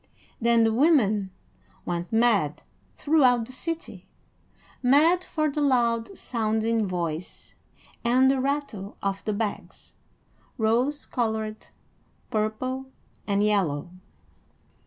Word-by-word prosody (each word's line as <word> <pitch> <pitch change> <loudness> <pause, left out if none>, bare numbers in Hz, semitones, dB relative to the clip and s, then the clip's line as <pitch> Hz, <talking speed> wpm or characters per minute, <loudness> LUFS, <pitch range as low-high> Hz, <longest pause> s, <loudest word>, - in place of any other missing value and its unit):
Then 235 0 +4
the 225 0 +2
women 220 - +3 0.6
went 175 0 -3
mad 220 -10 +2 0.3
throughout 255 -6 +3
the 250 - -12
city, 330 +5 -6 0.7
mad 310 +8 +4
for 310 -4 -1
the 295 0 -2
loud 240 +3 +1
sounding 220 -1 0
voice 170 -2 -4 0.5
and 255 +3 +4
the 270 -1 0
rattle 270 -8 -3
of 195 0 -2
the 215 - 0
bags, 210 0 -5 0.6
rose 245 +6 +1
colored, 220 -3 -3 0.6
purple, 250 +5 -2 0.4
and 200 0 +1
yellow. 180 -6 0
230 Hz, 100 wpm, -26 LUFS, 210-265 Hz, 0.7 s, Then